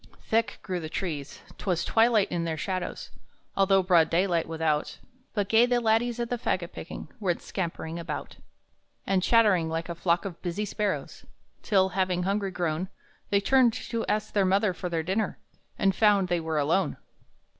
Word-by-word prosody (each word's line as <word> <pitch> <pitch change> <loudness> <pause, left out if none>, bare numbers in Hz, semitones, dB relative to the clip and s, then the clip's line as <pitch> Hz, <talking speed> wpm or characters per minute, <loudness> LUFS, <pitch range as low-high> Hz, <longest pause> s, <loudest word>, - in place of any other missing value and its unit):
Thick 225 -1 0
grew 185 -2 -3
the 160 -2 -6
trees; 155 -6 -5 0.2
'twas 180 -4 -1
twilight 225 -2 +3
in 175 -1 -1
their 165 -1 -2
shadows, 185 +2 -4 0.4
Although 195 -1 +4
broad 175 -3 +4
day 175 +3 +3
without; 160 -4 -1 0.4
But 205 -2 0
gay 225 +3 +5
the 245 -1 +2
laddies 235 +1 +1
at 235 0 -3
the 245 - -1
fagot 175 -6 -1
picking - - -8
Went 180 -5 -1
scampering 170 -2 -4
about, 165 -3 -6 0.7
And 190 -1 +2
chattering 200 -6 +4
like 165 +1 -3
a - - -2
flock 170 +2 0
of 180 -4 -6
busy 185 +4 -2
sparrows; 210 0 -3 0.4
Till, 190 -3 +3
having 185 -2 0
hungry 200 +1 0
grown, 175 0 -2 0.4
They 200 0 +3
turned 255 +1 +4
to 230 0 -3
ask 215 0 -1
their 200 - +3
mother 195 +1 +2
for 180 +1 -5
their 165 -2 -1
dinner, 195 +5 -1 0.4
And 195 0 +2
found 200 -3 +3
they 175 -1 +1
were 160 -1 -2
alone! 155 +7 +1
185 Hz, 170 wpm, -27 LUFS, 170-210 Hz, 0.7 s, gay